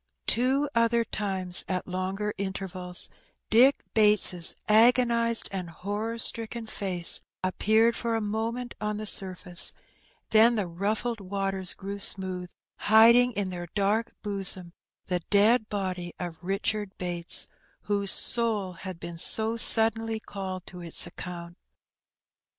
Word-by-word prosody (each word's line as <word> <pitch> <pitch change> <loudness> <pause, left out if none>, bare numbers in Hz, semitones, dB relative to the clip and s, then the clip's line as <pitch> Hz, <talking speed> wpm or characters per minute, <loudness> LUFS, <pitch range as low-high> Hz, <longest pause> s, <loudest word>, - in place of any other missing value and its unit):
Two 265 +4 +1
other 230 0 +1
times, 190 -4 -2
at 185 -1 -4
longer 190 +3 -4
intervals, 190 -2 -3 0.4
Dick 255 +5 +4
Bates* 210 -5 +5
agonized 235 +1 +3
and 185 -3 -6
horror 205 +7 -5
stricken 230 0 +2
face 185 -5 0 0.2
appeared 220 +5 +1
for 230 -1 -3
a - - -1
mo 220 +2 -3
ment 245 0 -8
on 210 0 -3
the 215 - -6
surface; 185 -3 +1 0.6
then 225 +2 +4
the 210 -4 -2
ruffled 210 +7 -4
waters 195 -1 -1
grew 200 +1 -8
smooth, 185 -2 0 0.3
hiding 235 +3 +5
in 200 -3 -3
their 175 -1 -7
dark 210 +3 -1
bosom 195 -4 0 0.3
the 180 -1 -2
dead 215 +3 +2
body 185 -4 -5
of 175 -2 -7
Eichard 195 +2 -3
Bates, 175 -1 -1 0.4
whose 200 -1 -3
soul 215 -6 -1
had 185 0 -10
been 170 -1 -7
so 220 +5 +5
suddenly 225 -1 +6
called 190 -3 -8
to 180 -1 -11
its 170 0 0
account. 175 0 -10
200 Hz, 130 wpm, -26 LUFS, 185-225 Hz, 0.6 s, suddenly